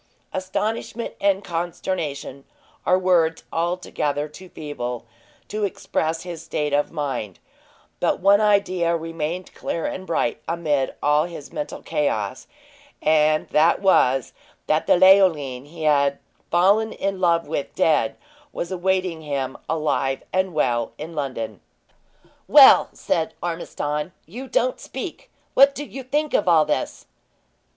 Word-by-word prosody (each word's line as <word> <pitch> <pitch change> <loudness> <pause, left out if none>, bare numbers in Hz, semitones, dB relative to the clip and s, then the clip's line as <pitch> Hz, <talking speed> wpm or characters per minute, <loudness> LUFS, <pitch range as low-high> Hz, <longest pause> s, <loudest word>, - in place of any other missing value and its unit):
Astonishment 210 +5 -3
and 200 0 +2
consternation 165 -5 -4 0.4
are 180 - +5
words 175 -3 +2
altogether 165 -4 -1
too 180 +5 -13
feeble 125 -7 -5 0.4
to 215 0 -3
express 165 -4 -2
his 175 -3 -7
state 150 -3 -2
of 145 +1 +1
mind; 135 - -4 0.6
but - - +1
one 200 +2 +5
idea 185 -5 +2
remained 165 +2 -5
clear 165 - -3
and 185 0 -4
bright 155 -2 -1
amid 150 -5 0
all 150 +2 +3
his 165 -5 -9
mental 150 0 -5
chaos, 110 -5 -2 0.5
and 155 0 +3
that 155 +3 +4
was, 135 - +3 0.3
that 155 +1 +1
the - - +5
Leoline 170 -9 +4
he 160 +1 -9
had 140 -2 +3 0.3
fallen 200 +6 +3
in 195 -1 -3
love 170 -3 +2
with 145 -2 -4
dead, 150 -8 +2 0.3
was 170 - -5
awaiting 185 -2 0
him, 140 -3 -3
alive 150 -4 0
and 185 -2 0
well, 120 -6 0
in 160 +3 -7
London. 130 - -4 0.9
"Well," - - +8
said 160 -1 -1
Ormiston, 150 -2 -3
"you 245 - -8
don't - - 0
speak! - - -7 0.2
What 275 +1 +6
do 290 - -5
you 270 - -8
think 295 +4 -1
of 205 - +2
all 160 -3 +5
this?" 150 - -2
165 Hz, 130 wpm, -23 LUFS, 145-185 Hz, 0.9 s, Well